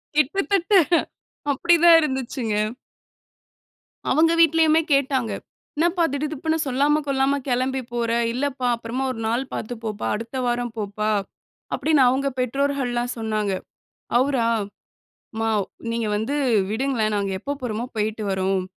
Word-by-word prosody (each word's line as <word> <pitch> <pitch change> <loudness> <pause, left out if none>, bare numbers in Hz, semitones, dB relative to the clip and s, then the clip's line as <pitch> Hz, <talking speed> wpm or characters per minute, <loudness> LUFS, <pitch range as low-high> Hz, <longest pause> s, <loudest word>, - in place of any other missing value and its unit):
கிட்டத்தட்ட, 385 +6 +1 0.8
அப்படி 345 +5 +3
தான் 335 -1 +9
இருந்துச்சுங்க. 260 -5 -2 1.6
அவுங்க 325 +2 +4
வீட்லயுமே 325 0 +5
கேட்டாங்க. 265 -4 +2 0.5
"என்னப்பா? 345 +2 +2
திடுதிப்புன்னு 305 +2 -1
சொல்லாம 285 +4 +2
கொள்ளாம 275 +1 +1
கெளம்பி 260 +2 0
போற. 235 -1 -1 0.2
இல்லப்பா, 260 0 -2
அப்பறமா 235 +3 -4
ஒரு 225 - -7
நாள் 240 +3 0
பார்த்து 240 +3 -4
போப்பா. 215 -1 -3
அடுத்த 230 +4 -5
வாரம் 240 -1 -1
போப்பா." 210 +1 -2 0.6
அப்படீன்னு 305 -4 +3
அவுங்க 275 +2 +1
பெற்றோர்கள்லாம் 250 -2 -1
சொன்னாங்க. 215 -3 -1 0.7
அவுரா, 260 -3 +1 0.9
"அம்மா 225 0 -1 0.4
நீங்க 230 -1 -1
வந்து 225 +7 -2 0.4
விடுங்களேன். 225 -3 0
நாங்க 200 -1 -1
எப்ப 285 0 -4
போறமோ, 230 -1 -2
போயிட்டு 215 +1 -1
வர்றோம். 190 0 0
260 Hz, 115 wpm, -23 LUFS, 225-285 Hz, 1.6 s, தான்